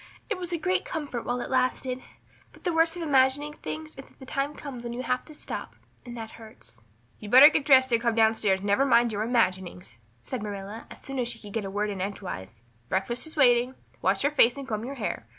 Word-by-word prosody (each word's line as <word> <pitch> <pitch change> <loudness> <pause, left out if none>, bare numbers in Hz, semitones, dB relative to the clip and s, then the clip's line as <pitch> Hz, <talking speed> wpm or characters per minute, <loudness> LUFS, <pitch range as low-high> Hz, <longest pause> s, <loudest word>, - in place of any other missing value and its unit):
It - - 0
was 355 -1 -5
a 340 - 0
great 370 +3 0
comfort 290 -8 -5
while 245 0 -1
it - - -5
lasted. 255 0 0 0.5
But - - -19
the 350 - 0
worst 325 +1 +3
of 345 - -4
imagining 285 0 +2
things 310 +1 -6
is - - -18
that - - -24
the 265 - -12
time 275 +2 -2
comes 260 -5 -8
when 235 0 -5
you 250 +2 -4
have 250 +1 -1
to 310 - -12
stop - - -6 0.3
and 240 -1 -9
that 225 -1 -7
hurts." 115 - -14 0.4
"You'd 210 - -8
better 260 +6 +10
get 310 -2 0
dressed 260 -3 +6
and 230 -1 +3
come 235 -1 +1
down 220 -1 +5
stairs 195 -4 +1
and - - -7
never 205 +6 +3
mind 235 -3 +4
your 210 -1 -2
imaginings," 185 - -1 0.2
said 245 - -6
Marilla 205 +1 -7
as - - -12
soon 270 -1 -5
as 245 - 0
she 235 -1 -3
could 205 -3 -11
get 225 -3 -2
a - - -4
word 205 +1 -1
in 195 -2 -5
edgewise. 120 - -6 0.3
"Breakfast 235 +9 0
is 315 - -6
waiting. 250 -2 +4 0.3
Wash - - +1
your 285 - +2
face 245 -3 +5
and 275 -1 -7
comb 215 -2 -3
your 275 +2 -6
hair. 205 - -4
240 Hz, 240 wpm, -27 LUFS, 210-275 Hz, 0.5 s, better